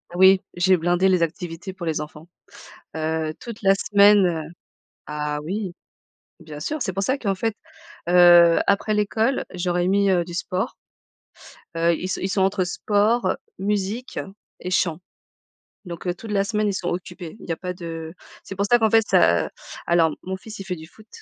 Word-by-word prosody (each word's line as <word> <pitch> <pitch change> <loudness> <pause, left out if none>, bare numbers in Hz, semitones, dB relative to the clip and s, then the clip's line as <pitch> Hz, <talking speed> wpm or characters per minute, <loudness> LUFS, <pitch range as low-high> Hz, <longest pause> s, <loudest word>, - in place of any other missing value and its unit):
Oui, 190 +1 +6
j'ai 185 +1 +3
blindé 175 +3 +2
les 185 -2 +3
activités 175 +2 -4
pour 175 -2 -7
les 160 -2 -1
enfants. 150 +2 -9 0.7
Heu, 160 0 -2
toute 235 -2 -9
la 195 -1 +5
semaine, 205 0 +5
heu 165 -3 0 0.7
ah 150 0 -3
oui 190 +2 -3 0.7
bien 150 -2 -9
sûr 305 - -3
c'est 190 - -1
pour 195 +2 -1
ça 260 +7 0
qu'en 200 -7 -1
fait, 225 +2 -2 0.5
heu, 175 -1 +7
après 200 +2 +2
l'école 220 +5 +1
je 180 0 -4
leur 175 - 0
ai 175 - +1
mis, 200 0 +3
heu, 180 -2 +3
du 175 0 -10
sport. 185 +2 -3 1.0
Heu, 170 +1 +3
ils 185 - -5
sont - - -2
ils 190 - -1
sont 190 0 0
entre 190 0 +2
sport, 210 +6 +1 0.2
musique 210 +4 -2 0.4
et 180 - -5
chant. 170 -3 +1 0.9
Donc, 175 +1 -7
heu, 175 - +1
toute 220 +4 -9
la 200 -1 +2
semaine 210 +1 -1
ils 200 - 0
sont 180 -2 -3
occupés. 175 0 -6
Il - - -12
y - - 0
a 165 - 0
pas 180 +1 -5
de 165 -2 -7 0.3
c'est 195 - -8
pour 200 - 0
ça 240 +4 +4
qu'en 220 -1 +3
fait 225 0 +4
ça - - +3 0.4
alors 170 -1 +3
mon 185 - -7
mon 190 - -2
fils, 215 +2 -10
il 195 - -5
fait 185 -2 -3
du 160 -1 -11
foot 215 +5 -19
185 Hz, 195 wpm, -23 LUFS, 170-205 Hz, 1.0 s, heu